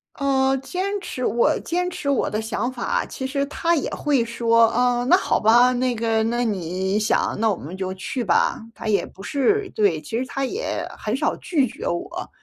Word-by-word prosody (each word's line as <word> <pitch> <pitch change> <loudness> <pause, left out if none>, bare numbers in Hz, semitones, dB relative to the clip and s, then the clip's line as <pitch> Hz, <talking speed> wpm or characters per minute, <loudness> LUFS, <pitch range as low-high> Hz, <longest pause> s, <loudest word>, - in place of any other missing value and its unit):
呃， 270 -1 +2
坚 380 +9 -3
持 255 -8 -6
我 240 +6 +2
坚 360 +1 -1
持 280 -5 -4
我 275 - +1
的 215 +1 -2
想 225 +2 -2
法， 250 - -1
其 265 - -6
实 275 +1 -1
他 335 +4 0
也 290 - -1
会 280 -6 +1
说， 230 0 +3
呃， 245 0 +1
那 355 - +6
好 385 - +1
吧， 240 +3 +5
那 250 -1 0
个 225 0 +1
那 240 +2 0
你 190 -1 -1
想 210 - +1
那 225 -1 +3
我 200 - +1
们 165 +4 -8
就 190 0 -3
去 215 +7 -4
吧， 175 - +2 0.2
他 225 - -7
也 205 -2 +2
不 195 - -13
是 380 - +1
对， 195 -8 +1
其 225 +9 -4
实 255 - -1
他 270 +1 -3
也 415 - -2
很 - - -2
少 - - 0
拒 295 -7 +1
绝 310 - -6
我， - - -4
245 Hz, 215 characters per minute, -23 LUFS, 220-280 Hz, 0.2 s, 那